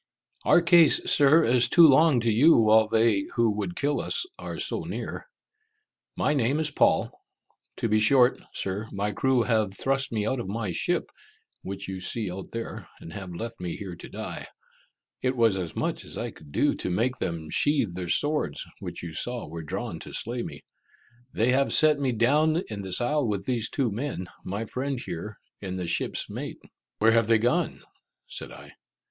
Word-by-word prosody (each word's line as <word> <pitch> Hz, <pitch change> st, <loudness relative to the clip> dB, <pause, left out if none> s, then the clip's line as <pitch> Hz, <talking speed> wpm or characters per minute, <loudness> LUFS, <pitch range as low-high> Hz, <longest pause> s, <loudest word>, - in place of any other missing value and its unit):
"Our 175 Hz, -, +5 dB
case, 170 Hz, -3 st, +6 dB
Sir, 150 Hz, +3 st, +5 dB
is 120 Hz, -1 st, +3 dB
too 170 Hz, +4 st, +7 dB
long 145 Hz, -2 st, +5 dB
to 115 Hz, 0 st, +1 dB
you 145 Hz, +10 st, +6 dB
while 110 Hz, -1 st, +5 dB
they 110 Hz, -3 st, +2 dB
who 115 Hz, -2 st, +3 dB
would 100 Hz, -4 st, -4 dB
kill 145 Hz, 0 st, 0 dB
us -, -, 0 dB
are -, -, -6 dB
so -, -, -1 dB
near. -, -, -6 dB, 0.9 s
My 150 Hz, -, +1 dB
name 135 Hz, +1 st, +1 dB
is 155 Hz, -2 st, 0 dB
Paul. -, -, +2 dB, 0.7 s
To -, -, -1 dB
be 110 Hz, 0 st, +2 dB
short, 125 Hz, +3 st, +4 dB
Sir, 100 Hz, +3 st, -3 dB
my 100 Hz, +1 st, -2 dB
crew 130 Hz, +3 st, +1 dB
have 110 Hz, -5 st, 0 dB
thrust 135 Hz, 0 st, 0 dB
me 105 Hz, -3 st, -1 dB
out 130 Hz, +3 st, -1 dB
of 115 Hz, -, -5 dB
my 105 Hz, -1 st, -3 dB
ship, -, -, -1 dB, 0.5 s
which 100 Hz, 0 st, -6 dB
you 95 Hz, -1 st, -5 dB
see 100 Hz, +1 st, -3 dB
out 95 Hz, +1 st, -7 dB
there, 115 Hz, 0 st, -6 dB
and 80 Hz, -, -10 dB
have 95 Hz, -4 st, -7 dB
left 115 Hz, +6 st, -6 dB
me 90 Hz, -2 st, -4 dB
here 95 Hz, -4 st, -7 dB
to -, -, -11 dB
die. -, -, -6 dB, 0.7 s
It 130 Hz, 0 st, -1 dB
was 115 Hz, -5 st, +3 dB
as 85 Hz, -4 st, -5 dB
much -, -, -2 dB
as -, -, -8 dB
I -, -, -4 dB
could 75 Hz, -2 st, -16 dB
do -, -, +2 dB
to -, -, -3 dB
make 120 Hz, +8 st, 0 dB
them 80 Hz, -6 st, -4 dB
sheath 140 Hz, -, +2 dB
their 90 Hz, -1 st, -5 dB
swords, 145 Hz, -, 0 dB
which -, -, -7 dB
you 85 Hz, -2 st, -6 dB
saw 120 Hz, +7 st, -3 dB
were 80 Hz, +2 st, -7 dB
drawn 75 Hz, -, -5 dB
to -, -, -9 dB
slay 120 Hz, +2 st, -1 dB
me. -, -, -8 dB, 0.7 s
They 115 Hz, +3 st, +1 dB
have 135 Hz, +2 st, +2 dB
set 155 Hz, -2 st, +4 dB
me 135 Hz, -2 st, 0 dB
down 150 Hz, -, +2 dB
in 105 Hz, -2 st, -5 dB
this 95 Hz, +3 st, -1 dB
isle 145 Hz, +1 st, +1 dB
with 100 Hz, -2 st, -2 dB
these 120 Hz, -4 st, 0 dB
two 130 Hz, -6 st, -1 dB
men, 110 Hz, -5 st, -4 dB
my 100 Hz, +4 st, -4 dB
friend 130 Hz, +3 st, -3 dB
here, 100 Hz, +1 st, -6 dB, 0.2 s
and 95 Hz, -2 st, -5 dB
the 90 Hz, -, -3 dB
ship's 85 Hz, -, -1 dB
mate." -, -, -6 dB, 0.4 s
"Where 110 Hz, +1 st, +4 dB
have 115 Hz, -1 st, +3 dB
they 115 Hz, 0 st, +5 dB
gone?" 120 Hz, +3 st, 0 dB, 0.4 s
said -, -, -6 dB
I. -, -, -12 dB
115 Hz, 190 wpm, -26 LUFS, 95-130 Hz, 0.9 s, too